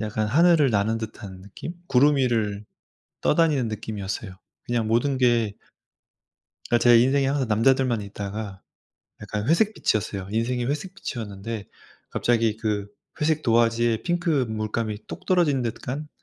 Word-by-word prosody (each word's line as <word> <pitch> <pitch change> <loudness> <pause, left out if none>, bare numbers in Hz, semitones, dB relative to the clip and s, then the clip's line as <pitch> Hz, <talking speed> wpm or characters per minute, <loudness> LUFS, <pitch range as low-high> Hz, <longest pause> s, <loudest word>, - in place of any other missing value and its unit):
약간 110 0 -1
하늘을 155 +2 +4
나는 110 +2 +1
듯한 100 -4 -8
느낌? 100 - -8
구름 145 +1 +4
위를 110 -6 0 0.6
떠다니는 150 -7 +2
느낌이었어요. 105 -2 -5 0.3
그냥 115 -2 -1
모든 125 +5 +1
게 120 -5 +2 1.1
그러니까 120 - +3
제 120 -1 +7
인생에 135 +2 +3
항상 135 -3 0
남자들만 120 +1 +2
있다가 100 0 -6 0.6
약간 105 +2 -4
회색빛이었어요. 110 - +1
인생이 120 +3 -1
회색빛이었는데 115 - -5 0.5
갑자기 115 -2 +1
그 105 -2 -2 0.3
회색 155 0 +1
도화지에 115 -1 +2
핑크 175 -6 +1
물감이 110 0 -3
똑 - - -9
떨어진 160 -8 +2
듯한? 130 +6 -4
115 Hz, 320 characters per minute, -24 LUFS, 105-135 Hz, 1.1 s, 제